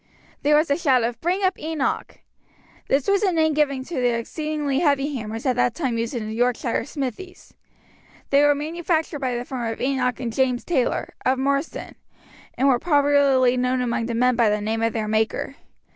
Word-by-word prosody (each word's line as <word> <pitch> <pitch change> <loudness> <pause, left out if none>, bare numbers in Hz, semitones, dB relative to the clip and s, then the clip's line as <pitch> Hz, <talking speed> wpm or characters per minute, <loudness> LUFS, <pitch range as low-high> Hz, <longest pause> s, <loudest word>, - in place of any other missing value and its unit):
There 295 +1 +3
was 305 -1 +1
a 285 - +3
shout 265 -8 +3
of 235 +1 -3
"Bring 365 +4 0
up 375 0 +1
Enoch!" 315 -2 -3 0.7
This 275 0 +1
was 400 -1 +3
a 395 -3 +2
name 315 -2 +2
given 280 -3 +1
to 330 - -10
the 245 -2 +1
exceedingly 295 +2 -2
heavy 290 -2 +1
hammers 225 0 -5
at 255 -2 +2
that 245 -2 +2
time 255 -8 -1
used 230 +3 -3
in 220 -3 -3
the 215 - -5
Yorkshire 240 0 0
smithies. 290 +6 -6 0.8
They 280 +1 +5
were 290 0 +4
manufactured 320 +1 -2
by 255 -3 -1
the 240 +1 -4
firm 240 -4 -3
of 225 - -7
Enoch 255 -2 0
& 245 -1 -4
James 250 +1 0
Taylor, 265 -8 -1
of 260 +1 +2
Marsden, 275 +3 -2 0.6
and 270 - +2
were 255 -3 +4
popularly 280 -4 +3
known 250 +1 +1
among 235 -2 -1
the 235 - -3
men 250 +1 +3
by 230 -2 +3
the 210 0 +1
name 220 +2 -2
of 230 0 +1
their 220 -2 -2
maker. 220 +1 -1
265 Hz, 195 wpm, -23 LUFS, 240-295 Hz, 0.8 s, They